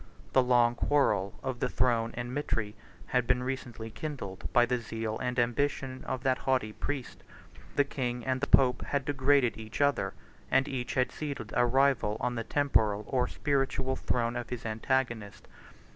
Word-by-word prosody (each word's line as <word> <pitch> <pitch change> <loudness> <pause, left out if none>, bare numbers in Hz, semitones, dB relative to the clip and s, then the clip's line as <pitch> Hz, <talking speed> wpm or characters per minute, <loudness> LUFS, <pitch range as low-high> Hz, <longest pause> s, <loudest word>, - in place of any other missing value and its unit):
The 130 - +6
long 120 -1 +4
quarrel 120 -7 +1
of 130 -2 -3
the - - 0
throne 115 -3 +2
and 120 +1 -4
mitre 115 -7 -2 0.3
had 125 -1 0
been 125 0 +2
recently 120 -4 -5
kindled 110 -10 -6
by 120 - +5
the 125 +1 0
zeal 110 -1 -4
and 125 0 -2
ambition 130 +2 0
of 130 - -3
that 130 -1 +2
haughty 125 -5 0
priest: 140 0 -4 0.3
83 - - -18
the 145 - +5
king 125 -4 -3
and 130 -1 0
the 140 - 0
pope 125 -2 +4
had 140 -2 -1
degraded 135 -4 +2
each 110 0 -7
other; 145 0 +1 0.3
and 135 - +3
each 125 -3 -3
had 130 -1 +2
seated 140 -8 -5
a 120 0 +4
rival 130 -4 +2
on 125 - -1
the 115 -1 -3
temporal 110 -7 +2
or 125 -2 +1
spiritual 135 -2 0
throne 120 -2 -1
of 120 -1 -4
his 125 -2 -5
antagonist. 115 -1 -2
125 Hz, 175 wpm, -30 LUFS, 115-135 Hz, 0.3 s, The